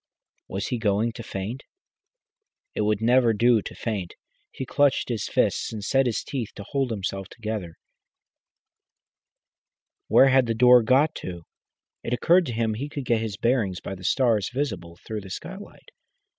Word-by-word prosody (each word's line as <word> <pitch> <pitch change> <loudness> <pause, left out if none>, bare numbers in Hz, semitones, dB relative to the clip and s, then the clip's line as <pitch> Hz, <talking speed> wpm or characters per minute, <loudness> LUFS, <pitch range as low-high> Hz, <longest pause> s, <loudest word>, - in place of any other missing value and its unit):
Was 100 +2 -4
he 125 - -2
going 110 +1 +1
to 115 - -9
faint? 110 +4 -5 1.1
It - - -2
would 105 0 0
never 120 0 +4
do 115 +1 +4
to - - -8
faint. 100 -7 -4 0.4
He 130 - -6
clenched 140 0 +2
his 115 -4 -2
fists - - 0
and 110 -2 -6
set 135 +2 +2
his 115 - -1
teeth 125 -6 -4
to 100 - -7
hold 135 -3 0
himself 95 -3 -4
together. 105 -7 -5 2.3
Where 135 - +6
had 130 -2 +4
the 115 - 0
door 125 +1 +7
got 130 +7 +3
to? 85 -2 -7 0.6
It 115 - -3
occurred 170 +8 +3
to 120 - -3
him 115 -1 0
he 135 +7 -5
could 145 -2 -5
get 115 -2 +1
his 110 -3 -4
bearings 115 -7 0
by - - -6
the 95 -1 -10
stars 110 -2 +2
visible 105 -11 -4
through 110 -1 -4
the 95 - -11
skylight. 190 - -9
115 Hz, 165 wpm, -25 LUFS, 105-130 Hz, 2.3 s, door